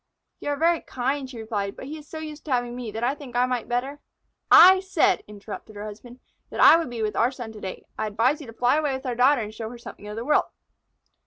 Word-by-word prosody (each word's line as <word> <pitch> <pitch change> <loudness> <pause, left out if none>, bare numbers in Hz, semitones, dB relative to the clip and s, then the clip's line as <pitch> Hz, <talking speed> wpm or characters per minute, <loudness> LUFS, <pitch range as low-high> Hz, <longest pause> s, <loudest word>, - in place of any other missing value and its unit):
"You - - -4
are 290 - 0
very 335 +1 +2
kind," 265 +2 -3
she 255 - -9
replied, 210 -3 -3
"but - - -9
he 295 +3 -6
is 295 - -15
so 320 - -8
used 310 -1 -7
to 300 - -6
having 245 -1 0
me 245 -2 -5
that 220 +2 -5
I 255 +3 +2
think 280 -4 -11
I 245 +1 +4
might 250 -2 -2
better 265 +4 -2 0.3
" - - -51 0.2
"I 380 - +2
said," 380 0 +2
interrupted 210 +1 -9
her 205 +1 -6
husband, 235 +4 -10 0.3
"that - - -7
I - - +9
would 330 -5 0
be 235 -2 -4
with 215 - -2
our 235 - +3
son 245 -4 -8
to 215 -1 -11
day. 190 - -7
I 215 - 0
advise 240 +9 +1
you 280 - -10
to 230 - -10
fly 245 +5 +2
away 300 -3 0
with 265 - -8
our 250 - -1
daughter 255 +2 +4
and 210 0 -7
show 220 0 -6
her 240 - -9
something 220 -3 -11
of 210 - -6
the 230 +2 -5
world." 300 - +3
245 Hz, 270 wpm, -25 LUFS, 220-290 Hz, 0.3 s, I